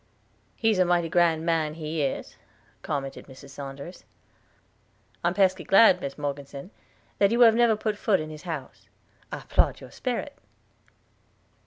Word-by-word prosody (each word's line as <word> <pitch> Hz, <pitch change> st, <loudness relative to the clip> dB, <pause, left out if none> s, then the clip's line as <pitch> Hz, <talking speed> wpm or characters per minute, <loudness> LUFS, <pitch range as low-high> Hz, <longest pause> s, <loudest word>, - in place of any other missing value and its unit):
"He's 220 Hz, -4 st, +1 dB
a -, -, +6 dB
mighty 175 Hz, -2 st, +1 dB
grand 165 Hz, -2 st, +2 dB
man, 160 Hz, -2 st, 0 dB
he 160 Hz, -1 st, -3 dB
is," 135 Hz, -2 st, -3 dB, 0.5 s
commented 135 Hz, -1 st, -5 dB
Mrs. 135 Hz, +1 st, -13 dB
Saunders. 140 Hz, +4 st, -9 dB, 1.2 s
"I -, -, +2 dB
am -, -, 0 dB
pesky 190 Hz, -2 st, +2 dB
glad, 195 Hz, -2 st, +6 dB
Mis 140 Hz, -, -5 dB
Morgeson, 140 Hz, +3 st, -6 dB, 0.5 s
that 200 Hz, -, +5 dB
you 235 Hz, +3 st, +1 dB
have 230 Hz, -2 st, +8 dB
never 230 Hz, -1 st, +4 dB
put 210 Hz, -1 st, -3 dB
foot 205 Hz, -4 st, +2 dB
in 155 Hz, 0 st, -6 dB
his 155 Hz, -, -9 dB
house. 165 Hz, -7 st, -7 dB, 0.4 s
I -, -, -5 dB
'plaud -, -, +2 dB
your -, -, -12 dB
sperit!" -, -, -4 dB
165 Hz, 150 wpm, -26 LUFS, 145-195 Hz, 1.2 s, have